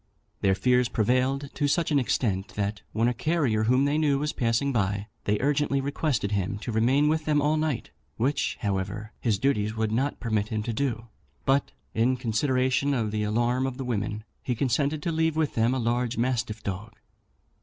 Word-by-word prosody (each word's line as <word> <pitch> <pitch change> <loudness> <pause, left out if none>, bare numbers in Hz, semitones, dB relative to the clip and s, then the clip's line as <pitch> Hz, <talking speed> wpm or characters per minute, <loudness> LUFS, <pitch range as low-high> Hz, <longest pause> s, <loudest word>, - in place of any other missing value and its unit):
Their 95 -1 +3
fears 125 +3 +2
prevailed 130 +5 +1
to 145 - 0
such 165 +3 +1
an 145 - +4
extent, 105 -6 -1
that, 100 0 -2
when 115 +2 +1
a 125 - +2
carrier 125 -6 +1
whom 125 +4 +3
they 145 +2 +1
knew 145 -3 +3
was 150 +2 -1
passing 125 +3 +1
by, 100 -2 0 0.2
they 105 0 +1
urgently 145 0 +1
requested 135 -6 -1
him 100 0 -1
to 120 - -4
remain 130 +7 +3
with 155 0 +1
them 150 -1 +3
all 150 +2 +2
night, 155 -5 -1 0.3
which, 135 +5 0
however, 105 +1 -2
his 110 -4 +1
duties 110 -3 0
would 110 -1 0
not 130 +6 0
permit 110 -3 0
him 110 -2 -2
to 115 - -3
do; 120 -3 -2 0.4
but, 135 - +2 0.2
in 125 +3 +2
consideration 130 +3 +1
of 110 -4 -1
the 105 0 -1
alarm 120 +5 +1
of 130 -1 -5
the 135 - -4
women, 105 -2 -2 0.2
he 130 -3 -2
consented 140 +5 0
to 170 - 0
leave 160 -1 +1
with 155 -2 0
them 115 +1 +2
a 130 - 0
large 120 +1 0
mastiff 115 -3 -1
dog. 105 +3 -5
125 Hz, 190 wpm, -27 LUFS, 110-140 Hz, 0.4 s, an